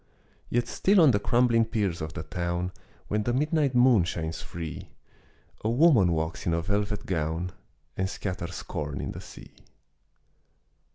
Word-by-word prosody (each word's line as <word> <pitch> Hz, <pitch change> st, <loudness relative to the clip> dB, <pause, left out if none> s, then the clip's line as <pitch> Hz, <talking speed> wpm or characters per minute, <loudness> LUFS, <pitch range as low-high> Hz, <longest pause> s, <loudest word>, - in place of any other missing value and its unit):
Yet 120 Hz, 0 st, 0 dB
still 195 Hz, +10 st, +3 dB
on 155 Hz, -5 st, +7 dB
the 100 Hz, -, +2 dB
crumbling 120 Hz, +1 st, +3 dB
piers 100 Hz, -7 st, -1 dB
of 80 Hz, +1 st, -5 dB
the 75 Hz, -, -5 dB
town, 85 Hz, +2 st, -2 dB, 0.4 s
When 105 Hz, +1 st, 0 dB
the 120 Hz, +3 st, 0 dB
midnight 150 Hz, 0 st, +1 dB
moon 120 Hz, -6 st, +6 dB
shines 80 Hz, -2 st, -3 dB
free, 85 Hz, -2 st, -7 dB, 0.7 s
A 110 Hz, -, +1 dB
woman 120 Hz, -, +5 dB
walks 80 Hz, +1 st, -2 dB
in 85 Hz, -, +2 dB
a 85 Hz, -, 0 dB
velvet 105 Hz, +2 st, -1 dB
gown 80 Hz, 0 st, -2 dB, 0.4 s
And 95 Hz, 0 st, -1 dB
scatters 90 Hz, -4 st, -5 dB
corn 75 Hz, -2 st, -4 dB
in -, -, -3 dB
the -, -, -8 dB
sea. -, -, -13 dB
95 Hz, 155 wpm, -27 LUFS, 85-120 Hz, 0.7 s, on